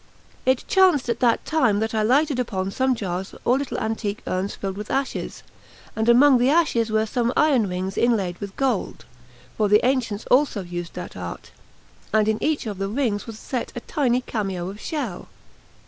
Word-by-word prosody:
It 260 -1 +2
chanced 365 -10 +4
at 235 - -1
that 235 -2 +2
time 255 -10 +2
that 220 +1 -2
I 220 - +1
lighted 270 +4 +2
upon 195 -6 -2
some 260 +4 +1
jars 190 -3 -4
or 255 +3 +3
little 280 - -4
antique 215 -2 -3
urns 185 +2 -2
filled 195 -1 -4
with 210 +1 -7
ashes, 270 0 -3 0.5
and 220 +1 +1
among 255 +2 +6
the 250 +2 +3
ashes 290 -8 +2
were 220 0 +1
some 235 +2 0
iron 265 -10 +3
rings 185 +2 -3
inlaid 200 -7 +1
with 200 -1 -6
gold 270 -2 -1 0.5
(for 210 -2 +1
the 210 +3 +4
ancients 245 -5 0
also 250 -6 +3
used 175 -1 -6
that - - -7
art), - - -7 0.6
and 215 -1 +3
in 220 0 0
each 305 -4 0
of 205 -3 -5
the 195 - -1
rings 220 -2 -1
was 225 -2 -7
set 250 +2 -4
a - - -3
tiny 250 -3 0
cameo 195 -7 -3
of 205 - -12
shell. 265 - -4
225 Hz, 185 wpm, -23 LUFS, 200-260 Hz, 0.6 s, among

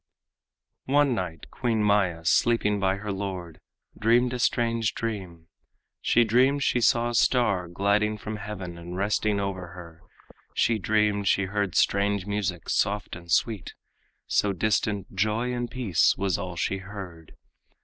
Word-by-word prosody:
One 140 0 +3
night 90 -7 -5
Queen 115 -4 0
Maya, 95 -5 +1
sleeping 105 +3 +2
by 95 -1 +1
her 105 +1 -5
lord, 95 -4 -5 0.4
Dreamed 120 +3 +2
a 125 - -3
strange 115 -2 +1
dream; 95 -8 -5 0.6
she 120 - +4
dreamed 130 +5 +3
she 125 - +1
saw 120 +1 +3
a - - -6
star 110 -6 +2
Gliding 100 +4 +1
from 105 +1 -6
heaven 95 -4 -7
and 85 +1 -7
resting 100 +1 0
over 95 -3 -3
her; 85 -2 -12 0.5
She 115 -2 +2
dreamed 105 0 +1
she 100 - +3
heard 100 -1 -2
strange 100 -1 +2
music, 100 -4 -3
soft 100 -1 0
and 85 0 -10
sweet, 105 -2 0 0.5
So 100 -1 +1
distant 105 0 -1
"joy 110 +6 0
and 120 -1 -3
peace" 120 -8 +2
was 95 -1 0
all 90 -2 -5
she 90 +2 -1
heard. 95 -5 -10
100 Hz, 145 wpm, -26 LUFS, 95-115 Hz, 0.6 s, she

